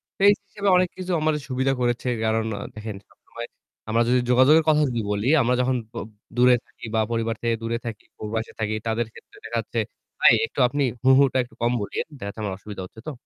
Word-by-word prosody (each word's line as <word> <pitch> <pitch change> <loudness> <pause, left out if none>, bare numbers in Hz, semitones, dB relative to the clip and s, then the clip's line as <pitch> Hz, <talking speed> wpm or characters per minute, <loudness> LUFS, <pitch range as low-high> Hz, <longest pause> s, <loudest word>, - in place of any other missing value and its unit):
তো - - -70
এই 205 - +8
হিসেবে 200 0 -1
অনেক 180 -1 +3
কিছু 185 0 -4
আমাদের 155 -1 +1
সুবিধা 130 +1 +1
করেছে 120 +1 0 0.2
কারণ 110 0 +1 0.3
দেখেন 110 -1 -6
সবসময় 120 0 -10 0.4
আমরা 115 +1 +3
যদি 125 0 +4
যোগাযোগের 135 +6 +6
কথা 150 0 +4
যদি 120 -2 -1
বলি 105 +4 -1
আমরা 125 +1 +2
যখন 130 +1 +1 0.2
ব - - -20 0.4
দূরে 125 0 +6
থাকি - - -12
বা 110 - +3
পরিবার 115 0 0
থেকে 115 -1 +1
দূরে 115 +1 -1
থাকি, 115 -3 -6 0.2
ওর 105 - -5
বয়সে 115 0 -3
থাকি 110 0 -1
তাদের 115 +1 0
ক্ষেত্রে 405 - -16
দেখাচ্ছে - - -2 0.4
ভাই - - +7
একটু - - -8
আপনি 145 +2 -1 0.2
হুহুটা 130 0 +5
একটু 115 -2 -16
কম 120 +1 +2
বলিইয়েন 100 - -3
দেখা - - -8
যাচ্ছে 100 - -7
আমার 100 - -2
অসুবিধা 100 -1 -8
হচ্ছে 110 - -14
তো? - - -2
120 Hz, 210 wpm, -24 LUFS, 110-135 Hz, 0.4 s, এই